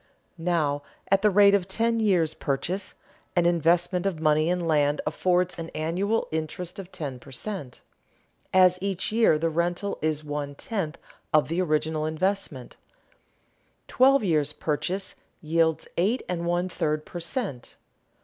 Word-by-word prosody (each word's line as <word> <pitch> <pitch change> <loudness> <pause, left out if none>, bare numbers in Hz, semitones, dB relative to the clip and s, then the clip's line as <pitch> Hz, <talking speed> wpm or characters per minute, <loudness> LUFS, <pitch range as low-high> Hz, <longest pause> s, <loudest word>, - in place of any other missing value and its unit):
Now 160 -4 0 0.3
at 195 0 +4
the 210 - +5
rate 200 0 +6
of 195 -3 +2
"ten 230 +4 +1
years' 180 -8 +2
purchase" 175 +7 -3 0.4
an 175 -1 +3
investment 175 +2 +2
of 180 -5 -2
money 155 +1 +3
in 180 -1 0
land 145 -2 +2
affords 180 -1 +1
an 165 0 -5
annual 185 +8 0
interest 160 +4 -4
of 190 -1 -9
ten 135 -5 -5
per - - -15
cent., 145 - -6 0.7
as 185 -1 +5
each 195 -1 -1
year 225 -8 +4
the 165 +1 0
rental 175 +4 -1
is 155 -1 -1
one 145 -1 -4
tenth 175 -4 -3 0.3
of 155 -3 +3
the 170 +3 0
original 155 -2 0
investment; 160 -5 -2 1.1
twelve 270 0 +4
years' 150 -6 +1
purchase 165 +6 -2 0.3
yields 160 -1 +1
eight 215 +9 +1
and 170 -1 -2
one 175 +1 +1
third 155 -3 -2
per 175 - -7
cent. 170 - -4
170 Hz, 145 wpm, -26 LUFS, 155-190 Hz, 1.1 s, rate